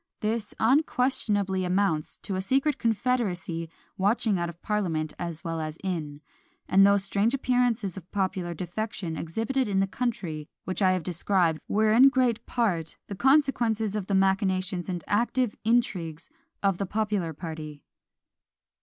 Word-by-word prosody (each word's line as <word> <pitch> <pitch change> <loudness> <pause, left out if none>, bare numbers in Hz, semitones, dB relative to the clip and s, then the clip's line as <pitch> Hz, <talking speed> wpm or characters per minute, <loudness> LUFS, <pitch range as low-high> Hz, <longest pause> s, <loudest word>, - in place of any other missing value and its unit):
This 215 0 -2
unquestionably 225 -7 +2
amounts 180 -4 0
to 195 - -3
a 185 - -1
secret 270 +7 +1
confederacy 210 -8 -1 0.3
watching 205 0 +2
out 170 0 -1
of 170 0 -11
parliament 165 -8 -1
as 170 -1 -4
well 165 -2 -3
as 155 0 -5
in; 155 -6 -3 0.5
and 195 +1 +5
those 200 0 +5
strange 205 +5 +1
appearances 245 -7 +1
of 180 -2 -11
popular 185 -3 -1
defection 180 0 -4
exhibited 225 - -1
in 195 -2 +1
the 195 - +3
country, 190 -9 -3
which 185 +2 -3
I 185 -1 +5
have 185 -2 -1
described, 170 -1 +1
were 215 +1 +3
in 260 +4 +8
great 250 -4 +1
part 180 -10 -1
the 200 - -4
consequences 235 -5 +2
of 205 -3 -3
the 200 - +1
machinations 190 -2 +1
and 175 -2 -3
active 240 +2 +1
intrigues 185 -9 0 0.3
of 195 -3 +2
the 200 - -1
popular 210 -5 -1
party. 155 -2 -7
195 Hz, 145 wpm, -27 LUFS, 175-225 Hz, 0.5 s, in